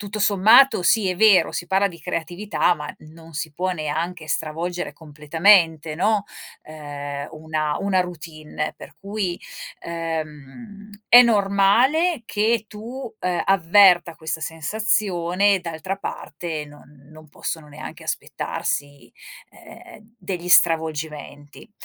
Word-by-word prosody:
tutto 210 +1 -6
sommato 210 +4 +5
sì, 190 +2 +3
è - - -2
vero, 205 0 +4
si 175 - -4
parla 195 +2 +2
di 170 -4 -8
creatività 175 +5 -1
ma 150 -2 -7
non 160 +1 -15
si 160 0 -4
può 185 +4 -2
neanche 160 +1 -4
stravolgere 165 +4 -3
completamente, 160 +1 +2
no, 205 +5 +1 0.4
ehm, 145 -2 -7
una 155 -1 -3
una 195 -2 +1
routine. 155 -3 -6
Per - - -12
cui, 195 -3 -3 0.4
ehm, 165 - -7 0.2
è 245 - +9
normale 235 - +2
che 220 +2 0
tu, 235 +5 -8
ehm, 180 -2 -1
avverta 180 -2 +4
questa 160 0 -5
sensazione, 190 +2 0
d'altra 170 +3 -5
parte 160 -4 -6
non 145 -1 -18
non 155 0 -15
possono 155 +1 -6
neanche 145 +1 -10
aspettarsi, 145 0 -4 0.4
ehm, 230 -12 -16
degli 180 -4 -5
stravolgimenti. 160 0 0
175 Hz, 115 wpm, -22 LUFS, 155-200 Hz, 0.4 s, è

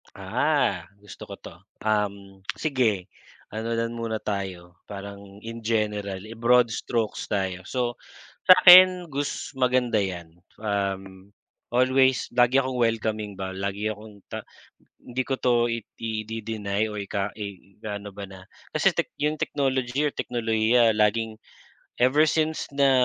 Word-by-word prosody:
Ah, 100 - 0 0.2
gusto 105 - -11
ko - - -7
'to, - - -12 0.3
um, 100 -2 -1 0.2
sige 125 - +1 0.5
ano 115 +2 -3
lang 115 0 -1
muna 115 -1 -2
tayo 95 -4 -5
parang 100 0 -9
in 115 +1 -6
general, 105 -3 -1
i-broad 115 +2 +3
strokes 115 -2 -2
tayo. 95 -2 -2
So 120 -2 -2 0.5
sa'kin 185 -1 +9
gus 145 +1 -3
maganda 125 -3 +2
'yan, 85 -3 -5 0.2
um, 100 -1 -4 0.3
always 130 +1 +3
lagi 125 +2 +4
akong 130 -1 -3
welcoming 110 -3 0
ba, 95 0 -5
lagi 100 +3 -2
akong 105 -1 -12
ta - - -3 0.6
hindi 125 +1 -4
ko 135 +1 -2
'to 120 -2 +2
idi-de-deny 110 -2 -3
or 105 - -6
ika 100 0 -2
ikaano 100 0 -7
ba 100 0 -8
na. 95 -1 -12 0.3
Kasi - - +4
tech - - -2
'yong 150 +1 +1
technology 135 -2 -1
or 150 - +2
teknolohiya 115 -2 +2
laging 110 +1 +1 0.6
ever 145 +5 +4
since 160 0 -1
na, 140 -1 +3
110 Hz, 130 wpm, -25 LUFS, 100-125 Hz, 0.6 s, sa'kin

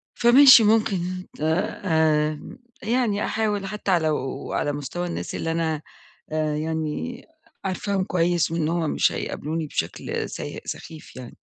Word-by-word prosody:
فماشي 250 0 +8
ممكن 190 -4 +1 0.2
آآ 160 -2 +1 0.4
يعني 225 -2 +1
أحاول 210 -2 -1
حتى 195 -3 0
لو 150 -5 -2
على 145 - 0
مستوى 145 +5 -4
الناس 170 - -4
اللي 165 - -2
أنا 160 -2 -1 0.8
يعني 160 +8 -3 0.4
عارفاهم 195 +1 -1
كويس 175 -2 +1
وإن 165 -2 0
هُم 165 -2 0
مش - - +2
هيقابلوني 155 +1 -3
بشكل - - -3
سيء - - -6
سخيف 160 -1 -8
يعني. 125 -2 -10
170 Hz, 120 wpm, -24 LUFS, 155-200 Hz, 0.8 s, فماشي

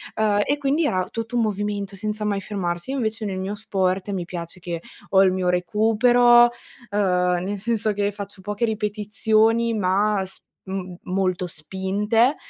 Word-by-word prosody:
ehm, 210 -1 +2
e 285 - 0
quindi 285 +3 +1
era 185 -9 0
tutto 230 +1 -4
un 235 - +3
movimento 205 -1 -2
senza 210 +2 -3
mai 200 -1 0
fermarsi. 175 -2 -3
Io 275 - -2
invece 220 -2 -2
nel 190 -2 -3
mio 190 +2 -3
sport 195 -2 -1
mi 190 -3 -2
piace 170 0 -7
che 170 -2 -5 0.3
ho 190 - +5
il 190 - +4
mio 185 -1 0
recupero, 240 +6 +5 0.4
uhm, 180 -3 +1
nel 200 +2 -3
senso 220 0 +1
che 205 0 0
faccio 200 -1 -9
poche 205 +4 -1
ripetizioni 215 -2 -1 0.9
ma 200 +1 +2
s 190 - -10 0.3
m 185 -2 -4
molto 185 -1 -1
spinte, 200 - 0
200 Hz, 165 wpm, -23 LUFS, 185-215 Hz, 0.9 s, ho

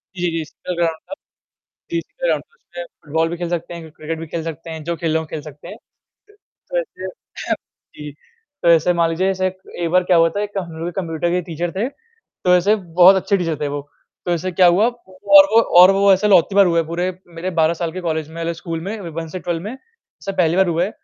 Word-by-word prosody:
जी, 175 -1 -1
जी। 165 0 -2
इसका 170 +3 -7
ग्राउन्ड 165 -2 0
था। - - -5 0.8
जी, 335 - 0
इसका - - -5
ग्राउन्ड - - 0
था। 470 - -35
उसमें - - -9 0.2
फुटबॉल 160 +2 0
भी 170 - -4
खेल 175 0 -4
सकते 175 0 -3
हैं, 165 -2 -9
क्रिकेट 160 +1 -6
भी 165 - -6
खेल 160 +1 -4
सकते 165 0 -7
हैं 160 -1 -6
जो 170 +1 -2
खेलना 160 -1 0
हो 155 - -3
सकते 150 -1 -11
हैं, - - -8 0.5
तो 420 +4 -9
ऐसे 430 - -7 0.4
हाँ - - +1 0.4
जी। 150 -1 -8 0.5
तो 170 - +4
ऐसे 170 +1 +4
मान 170 -1 +2
लीजिए 185 +4 0
ऐसे 185 0 0
एक 185 -2 -5
बार 185 0 +4
क्या 180 -1 +3
हुआ 165 0 +5
था, 200 +4 -3
एक 205 -1 -4
हम 175 -3 -4
लोग 165 - -4
के - - -8
कंप्यूटर 165 -1 -2
के 180 +1 +1
टीचर 170 +1 -3
थे, 195 +6 -1
तो 455 - -2
ऐसे 200 +5 +3
बहुत 180 0 +5
अच्छे 195 +1 +1
टीचर 165 -3 -1
थे 150 - 0
वो, 145 0 -3 0.4
तो 175 - -1
ऐसे 175 +2 -1
क्या 180 0 +5
हुआ 185 +6 +4
और 200 -4 +4
वो 230 - +7 0.2
और 185 +2 +9
वो 195 0 +4
ऐसे 210 +3 +2
लौती 190 0 +4
बार 200 -1 +7
हुए 170 -2 +2
पूरे 170 +3 -2 0.2
मेरे 170 +3 -3
12 160 +1 +4
साल 170 -1 -3
के 185 - -5
कॉलेज 160 -3 -2
में 165 +1 -3
स्कूल 165 -1 -5
में 200 +5 -5
1 165 +1 -5
से 185 - -6
12 170 -2 -3
में 210 - -5
ऐसा 460 - -11
पहली 170 -2 +3
बार 190 -1 +4
हुआ 170 0 +1
है, 190 - -1
175 Hz, 240 wpm, -20 LUFS, 165-190 Hz, 0.8 s, और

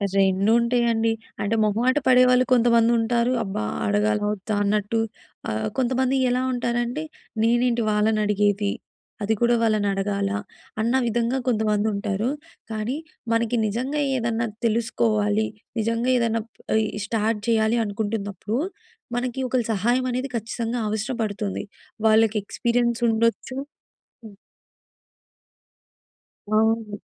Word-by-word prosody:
రెండుంటాయండి. 225 +4 +3 0.3
అంటే 205 +2 0
మొహమాట 230 +5 +2
పడేవాళ్ళు 250 0 +5
కొంతమంది 235 -1 +4
ఉంటారు. 235 +2 +1
అబ్బా! 195 - -3 0.2
అడగాలా? 210 +1 +1
వద్దా? 210 +1 -3
అన్నట్టు. 210 +2 0 0.5
ఆహ్, 110 0 -1
కొంతమంది 260 +1 +1
ఎలా 250 +1 +1
ఉంటారంటే 240 +3 -1 0.4
నేనేంటి 240 0 +2
వాళ్ళనడిగేది. 210 -1 +2 0.5
అది 215 +2 +2
కూడా 240 0 +4
వాళ్ళనడగాలా? 200 -2 0 0.4
అన్న 230 +3 +1
విధంగా 235 +2 0
కొంతమందుంటారు. 210 -1 0 0.4
కానీ 220 +5 -2 0.4
మనకి 230 +1 +1
నిజంగా 255 +8 -1 0.2
ఏదన్నా 230 -1 -1 0.2
తెలుసుకోవాలి. 220 -2 +1 0.3
నిజంగా 230 +3 0
ఏదైనా 230 -1 +1 0.4
ఇ - - 0 0.2
స్టార్ట్ 220 0 0
చేయాలి 225 0 +2
అనుకుంటున్నప్పుడు. 205 +1 -3 0.6
మనకి 245 +1 -2
ఒకళ్ళ 250 -2 0
సహాయం 240 +6 +1
అనేది 255 +3 -2
ఖచ్చితంగా 230 +1 -3
అవసరపడుతుంది. 215 -3 -2 0.4
వాళ్ళకి 220 0 +4
ఎక్స్‌పీరియన్స్ 235 +2 0
ఉండొచ్చు 230 +3 0 0.7
హ్మ్. 210 -2 -11 2.1
అవును. 215 -1 +1
225 Hz, 95 wpm, -24 LUFS, 210-240 Hz, 2.1 s, పడేవాళ్ళు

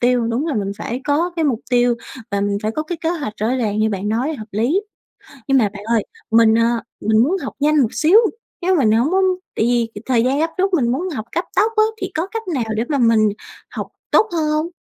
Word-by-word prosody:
tiêu. 245 -1 +2
Đúng 235 +7 -1
là 310 - -1
mình 200 -2 -2
phải 240 +4 -4
có 305 +5 +1
cái 325 - +1
mục 250 -6 0
tiêu 245 -1 +3 0.4
và 200 0 0
mình 200 0 0
phải 215 - 0
có 305 - -2
cái 325 +1 -5
kế 325 - -1
hoạch 300 -10 -3
rõ 215 - +1
ràng 215 -4 -1
như 215 0 +2
bạn 200 0 -3
nói 250 +9 0
hợp 220 -6 -8
lý. 240 - +1 0.7
Nhưng 270 - +4
mà 220 -5 +3
bạn 205 0 -10
ơi, 225 -1 +1 0.3
mình, 225 0 +5
à, 230 0 +2 0.2
mình 220 0 +3
muốn 330 +8 +1
học 265 - -5
nhanh 300 +1 +3
một 235 -3 0
xíu, 335 +7 +5 0.4
chứ 370 +2 +2
mình 235 -8 +3
hổng 235 +9 +2
muốn 380 0 +3 0.3
tại 220 - +1
vì 230 -3 0
thời 240 -3 +2
gian 270 +3 +1
gấp 325 +1 +1
rút 385 +1 +1
mình 240 -8 +2
muốn 345 +9 -2
học 225 -10 -5
cấp 345 - -1
tốc 445 - +3
á 430 - +6 0.2
thì 380 0 -3
có 325 +4 -1
cách 450 +2 -5
nào 260 -5 0
để 220 - 0
mà 290 - +1
mình 230 -4 +4 0.4
học - - -5 0.2
tốt 440 - +5
hơn 315 -3 0
hông? 305 +2 0
245 Hz, 250 wpm, -19 LUFS, 220-315 Hz, 0.7 s, á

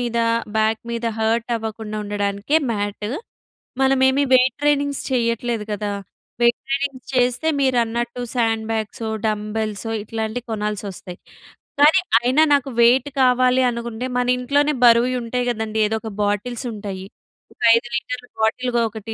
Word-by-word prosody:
మీద, 235 -1 -1 0.4
బాక్ 220 0 +1
మీద 235 0 -3
హాట్టవ్వకుండా 225 -1 -2
ఉండడానికే 205 +6 -1 0.2
మ్యాట్. 205 0 -3 0.7
మనమేమీ 265 +1 +3
వెయిట్ 255 -1 +4
ట్రెయినింగ్స్ 285 -1 +1
చెయ్యట్లేదు 235 -2 0
కదా! 205 0 -2 0.5
వెయిట్ 235 0 +4
ట్రైనింగ్స్ 275 -1 -3
చేస్తే 250 +4 +1
మీరన్నట్టు 240 -2 0
శాండ్ 225 -2 0
బ్యాగ్సో, 220 0 -3 0.2
డంబెల్సో 215 0 -2
ఇట్లాంటియి 220 +2 -4
కొనాల్సొస్తయి, 205 -4 -4 0.6
కానీ 310 +6 +6 0.2
అయినా 255 +6 +3
నాకు 275 -1 +2
వెయిట్ 250 +4 +4
కావాలి 255 0 +4
అనుకుంటే, 235 0 -4
మనింట్లోనే 250 +4 +1
బరువుయి 240 +2 +5
ఉంటాయి 245 +1 -2
గదండీ. 220 -1 -3
ఏదోక 220 0 -3
బాటిల్సుంటయి. 205 -2 -3 0.5
ఒక - - -34
5 240 +1 0
లీటర్ల 245 +1 -4
బాటిల్‌గా 240 +2 +1
ఒకటి 220 0 -7
235 Hz, 115 wpm, -21 LUFS, 220-250 Hz, 0.7 s, కానీ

